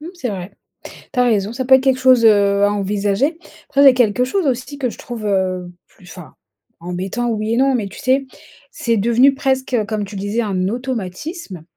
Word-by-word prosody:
Mmh, 320 Hz, -, -8 dB
c'est 300 Hz, -8 st, -4 dB
vrai. 185 Hz, -1 st, -6 dB, 0.4 s
Tu 255 Hz, -, -8 dB
as 250 Hz, -, +5 dB
raison 215 Hz, -3 st, +1 dB
ça 260 Hz, 0 st, -3 dB
peut 265 Hz, -, +7 dB
être 265 Hz, -, +1 dB
quelque 265 Hz, -1 st, +2 dB
chose, 255 Hz, -3 st, +5 dB
heu, 200 Hz, -2 st, +4 dB
à 205 Hz, -, +3 dB
envisager. 205 Hz, -, -1 dB, 0.3 s
Après 280 Hz, 0 st, +2 dB
j'ai 270 Hz, -2 st, +8 dB
quelque 245 Hz, 0 st, +2 dB
chose 335 Hz, +7 st, -1 dB
aussi 260 Hz, +2 st, -2 dB
que 255 Hz, -3 st, -1 dB
je -, -, -10 dB
trouve, 235 Hz, -3 st, -7 dB
heu, 185 Hz, -3 st, -1 dB, 0.2 s
plus 180 Hz, -, -21 dB
enfin, 180 Hz, -4 st, -12 dB, 0.4 s
embêtant 185 Hz, +7 st, -3 dB
oui 220 Hz, 0 st, -2 dB
et -, -, 0 dB
non 270 Hz, 0 st, +3 dB
mais, 215 Hz, -5 st, -1 dB
tu -, -, -12 dB
sais, 265 Hz, +1 st, +1 dB, 0.4 s
c'est 235 Hz, -, -1 dB
devenu 235 Hz, +6 st, +4 dB
presque 265 Hz, -2 st, -1 dB
comme 215 Hz, -2 st, -2 dB
tu 200 Hz, +1 st, -10 dB
disais 205 Hz, +4 st, -2 dB
un 190 Hz, -4 st, -1 dB
automatisme 235 Hz, -, -5 dB
230 Hz, 205 wpm, -18 LUFS, 200-260 Hz, 0.4 s, j'ai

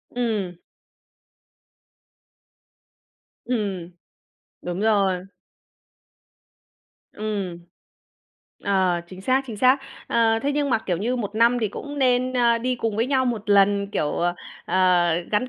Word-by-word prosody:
Ừm. 210 Hz, -8 st, -2 dB, 2.9 s
Ừm, 200 Hz, -8 st, -2 dB, 0.7 s
đúng 175 Hz, +2 st, -4 dB
rồi. 195 Hz, -4 st, +2 dB, 1.9 s
Ừm. 205 Hz, -5 st, -3 dB, 1.1 s
Ờ, 185 Hz, -3 st, +2 dB
chính 185 Hz, +1 st, -11 dB
xác, 260 Hz, +6 st, +2 dB
chính 225 Hz, -4 st, -6 dB
xác. 255 Hz, +5 st, +4 dB, 0.3 s
Ờ, 225 Hz, -1 st, +2 dB
thế 285 Hz, +1 st, 0 dB
nhưng 285 Hz, -1 st, 0 dB
mà, 225 Hz, -, +3 dB
kiểu 180 Hz, -, 0 dB
như, 235 Hz, +8 st, -1 dB
1 210 Hz, -3 st, -4 dB
năm 235 Hz, +2 st, +4 dB
thì 220 Hz, -, 0 dB
cũng 290 Hz, +8 st, -7 dB
nên, 255 Hz, -1 st, +2 dB
ơ, 235 Hz, -2 st, +3 dB
đi 250 Hz, +2 st, -1 dB
cùng 225 Hz, -3 st, -2 dB
với 230 Hz, +2 st, +1 dB
nhau 260 Hz, -1 st, +2 dB
1 220 Hz, -4 st, -2 dB
lần, 200 Hz, 0 st, +4 dB
kiểu, 150 Hz, -7 st, -1 dB
ờ, 175 Hz, 0 st, 0 dB, 0.3 s
ờ, 180 Hz, -2 st, +3 dB, 0.2 s
gắn 215 Hz, +5 st, +1 dB
215 Hz, 125 wpm, -23 LUFS, 190-245 Hz, 2.9 s, xác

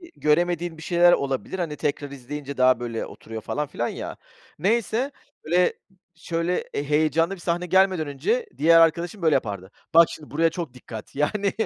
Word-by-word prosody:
göremediğim 175 Hz, +2 st, +1 dB
bir -, -, -11 dB
şeyler 175 Hz, 0 st, +5 dB
olabilir. 140 Hz, +6 st, -2 dB
Hani 165 Hz, -4 st, -2 dB
tekrar 145 Hz, -1 st, -2 dB
izleyince 140 Hz, +1 st, -7 dB
daha 130 Hz, -1 st, +4 dB
böyle 115 Hz, -2 st, -4 dB
oturuyor 110 Hz, 0 st, -9 dB
falan 150 Hz, +6 st, -3 dB
filan 120 Hz, -4 st, -3 dB
ya. -, -, -6 dB, 0.4 s
Neyse. 230 Hz, +6 st, +1 dB, 0.3 s
Böyle 180 Hz, +3 st, +3 dB, 0.4 s
şöyle 170 Hz, +1 st, -2 dB
e 140 Hz, -, -1 dB
heyecanlı 155 Hz, +4 st, +2 dB
bir -, -, -16 dB
sahne 175 Hz, +1 st, -1 dB
gelmeden 185 Hz, -3 st, +3 dB
önce 450 Hz, -, -1 dB
diğer 165 Hz, +2 st, +6 dB
arkadaşım 170 Hz, +4 st, +2 dB
böyle 160 Hz, -2 st, +3 dB
yapardı, 100 Hz, -6 st, -3 dB, 0.2 s
"Bak 165 Hz, +1 st, +8 dB
şimdi 150 Hz, -, -10 dB
buraya 165 Hz, +2 st, +3 dB
çok 165 Hz, -5 st, -6 dB
dikkat!" 115 Hz, -4 st, -10 dB
Yani. 195 Hz, +8 st, 0 dB
160 Hz, 165 wpm, -24 LUFS, 140-175 Hz, 0.4 s, Bak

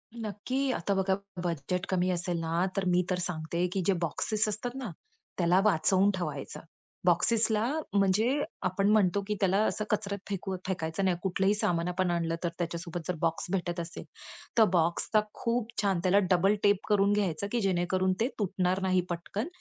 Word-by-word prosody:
नक्की, 225 Hz, +3 st, -4 dB
आता 200 Hz, -3 st, -1 dB
बघा, 190 Hz, 0 st, +2 dB, 0.3 s
बजेट 175 Hz, +2 st, -2 dB
कमी 185 Hz, -1 st, +1 dB
असेल 175 Hz, -1 st, -1 dB
ना 165 Hz, +2 st, 0 dB
तर 195 Hz, -, 0 dB
मी 180 Hz, +1 st, +3 dB
तर 180 Hz, -1 st, 0 dB
सांगते, 170 Hz, +1 st, -2 dB
की 195 Hz, -, 0 dB
जे 195 Hz, -, +5 dB
बॉक्सेस 215 Hz, +7 st, 0 dB
असतात 245 Hz, +4 st, -4 dB
ना? 220 Hz, -, -4 dB, 0.5 s
त्याला 175 Hz, +1 st, +4 dB
वाचवून 190 Hz, +1 st, +4 dB
ठेवायचं. 150 Hz, -6 st, -4 dB, 0.5 s
बॉक्सेसला 215 Hz, +5 st, +3 dB, 0.3 s
म्हणजे 200 Hz, +2 st, +3 dB, 0.4 s
आपण 195 Hz, +2 st, +1 dB
म्हणतो, 200 Hz, -2 st, +3 dB
की 210 Hz, -, 0 dB
त्याला 195 Hz, 0 st, +2 dB
असं 215 Hz, -, -1 dB
कचऱ्यात 200 Hz, -1 st, -1 dB
फेका 190 Hz, -1 st, -3 dB
फेकायचं 175 Hz, 0 st, -2 dB
नाही. 180 Hz, -2 st, +2 dB
कुठलंही 190 Hz, +1 st, +2 dB
सामान 175 Hz, -4 st, 0 dB
आपण 180 Hz, 0 st, 0 dB
आणलं 165 Hz, -1 st, 0 dB
तर 170 Hz, -, +1 dB
त्याच्यासोबत 170 Hz, 0 st, -3 dB
जर 180 Hz, -, -1 dB
बॉक्स 165 Hz, -1 st, 0 dB
भेटत 175 Hz, -2 st, -1 dB
असेल 170 Hz, 0 st, -6 dB, 0.5 s
तर 225 Hz, -, +8 dB
बॉक्सचा 175 Hz, +5 st, +2 dB
खूप 235 Hz, -1 st, -1 dB
छान 195 Hz, -4 st, +1 dB
त्याला 190 Hz, +2 st, +4 dB
डबल 190 Hz, +3 st, +4 dB
टेप 205 Hz, 0 st, +5 dB
करून 200 Hz, -1 st, +4 dB
घ्यायचं, 200 Hz, -2 st, 0 dB
की 240 Hz, -, 0 dB
जेणेकरून 185 Hz, 0 st, +1 dB
ते 230 Hz, -, +3 dB
तुटणार 185 Hz, -1 st, 0 dB
नाही 185 Hz, -1 st, +2 dB
पटकन. 175 Hz, -, -3 dB
185 Hz, 170 wpm, -29 LUFS, 175-205 Hz, 0.5 s, तर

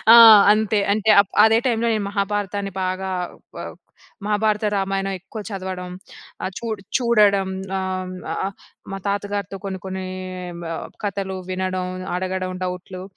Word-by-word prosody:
ఆ! -, -, +10 dB, 0.4 s
అంతే. 215 Hz, 0 st, +1 dB
అంటే 215 Hz, +1 st, 0 dB
అప్ 200 Hz, -, -10 dB
అదే 225 Hz, +1 st, +5 dB
టైమ్‌లో 235 Hz, -1 st, +1 dB
నేను 210 Hz, -2 st, -1 dB
మహాభారతాన్ని 200 Hz, -1 st, -1 dB
బాగా 185 Hz, +1 st, -2 dB, 0.5 s
ఆహ్, -, -, -7 dB, 0.5 s
మహాభారత, 210 Hz, 0 st, +1 dB
రామాయణం 195 Hz, 0 st, -1 dB
ఎక్కువ 195 Hz, +4 st, -9 dB
చదవడం 185 Hz, -2 st, -5 dB, 0.5 s
ఆహ్, 185 Hz, -, -2 dB
చూ -, -, -6 dB, 0.3 s
చూడడం 210 Hz, -6 st, +4 dB, 0.3 s
ఆహ్, 185 Hz, -1 st, -3 dB, 0.8 s
మా 195 Hz, -, -3 dB
తాతగారితో 200 Hz, -1 st, -2 dB
కొన్ని, 190 Hz, -1 st, -4 dB
కొన్ని 190 Hz, 0 st, -4 dB, 1.0 s
కథలు 195 Hz, -1 st, -3 dB
వినడం 185 Hz, 0 st, -2 dB, 0.3 s
అడగడం 185 Hz, 0 st, -2 dB
డౌట్‌లు. 180 Hz, 0 st, -6 dB
195 Hz, 120 wpm, -22 LUFS, 185-205 Hz, 1.0 s, ఆ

